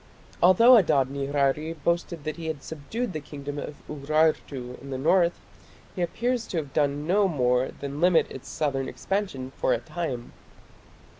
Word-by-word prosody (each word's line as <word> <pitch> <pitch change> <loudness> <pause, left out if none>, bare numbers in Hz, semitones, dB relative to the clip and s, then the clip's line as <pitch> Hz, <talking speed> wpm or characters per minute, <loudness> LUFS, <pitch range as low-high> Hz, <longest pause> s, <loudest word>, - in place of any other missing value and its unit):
Although 230 +8 +8
Adad 140 - +3
nirari 140 +3 0
boasted 170 +1 -2
that 155 +2 -4
he 165 -1 -6
had 155 -3 -4
subdued 185 +9 -4
the 155 - -3
kingdom 145 -1 -7
of 145 - -6
Urartu 145 -4 0
in 140 - -10
the 130 - -3
north, 170 +5 +3 0.6
he 180 - -3
appears 235 +7 -1
to 175 - -3
have 145 -4 -4
done 145 -1 +1
no 195 +4 +3
more 125 -5 +2
than 140 +2 -6
limit 180 -1 +5
its 130 - -9
southern 135 -3 -1
expansion 185 -11 -3
for - - +2
a - - +2
time. 125 -2 -5
150 Hz, 160 wpm, -26 LUFS, 140-175 Hz, 0.6 s, Although